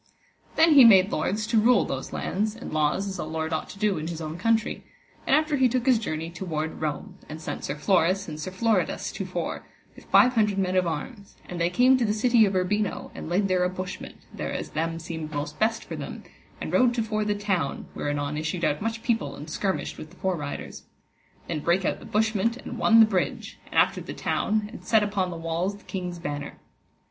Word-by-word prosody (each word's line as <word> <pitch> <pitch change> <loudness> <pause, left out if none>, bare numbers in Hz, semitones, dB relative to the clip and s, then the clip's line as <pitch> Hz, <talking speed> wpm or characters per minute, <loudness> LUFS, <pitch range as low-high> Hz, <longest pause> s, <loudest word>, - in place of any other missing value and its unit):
Then 320 0 +6
he 275 -3 +9
made 195 -4 +7
lords 205 +7 -1
to 225 0 +3
rule 235 0 +4
those 135 0 -4
lands, 210 +3 -2
and 230 - -8
laws 155 +6 +1
as 190 - -5
a - - -1
lord 160 +1 -3
ought 155 - -2
to - - -10
do 200 -4 +1
in 155 - -4
his 165 -1 -5
own 155 -1 -5
country; 220 +4 0 0.4
and - - +5
after 305 -1 +2
he 260 -1 +4
took 250 0 -1
his 255 -4 +4
journey 165 -5 -4
toward 160 -3 -4
Rome, 180 +5 -4
and 155 +1 -7
sent 155 - -5
Sir 140 - -3
Floris 185 +4 +2
and 155 -2 -6
Sir 155 - -4
Floridas 220 +4 0
to - - -5
fore, - - -4 0.3
with - - -15
five 250 0 +5
hundred 210 -4 +2
men 185 -1 0
of 185 -1 +3
arms, 200 - -6
and 175 -1 -5
they 170 - +3
came 255 +7 +5
to - - +2
the 210 - +1
city 230 0 +4
of 195 - -2
Urbino 200 +3 -1
and - - -7
laid 195 +3 +2
there 185 -1 +2
a 180 - +2
bushment, 185 0 -6 0.2
thereas - - -4
them 165 +1 -2
seemed 160 -2 -6
most 145 0 -4
best 225 +1 +1
for - - -7
them, - - -7 0.4
and - - -5
rode 250 -2 +4
to 230 - +1
fore 215 -1 -1
the 210 0 0
town, 195 -8 -1
where - - -3
anon 145 0 -2
issued 155 +3 -2
out 150 - 0
much 225 +1 -3
people 230 -3 0
and 155 +2 -9
skirmished 190 +3 -2
with 155 - -8
the 180 - -18
fore 190 0 -1
riders. 145 -3 -6 0.7
Then 160 - -2
brake 175 +5 +1
out - - 0
the - - -12
bushment 220 +1 +1
and 245 -2 -7
won 225 -1 +6
the - - +9
bridge, 195 -4 -2
and - - -11
after - - +3
the - - -7
town, 215 -1 0
and - - -10
set 220 -2 +3
upon 200 -3 -1
the 170 - -6
walls 165 +4 -2
the - - -20
king's 180 -2 -5
banner. 145 -3 -5
190 Hz, 225 wpm, -26 LUFS, 160-220 Hz, 0.7 s, he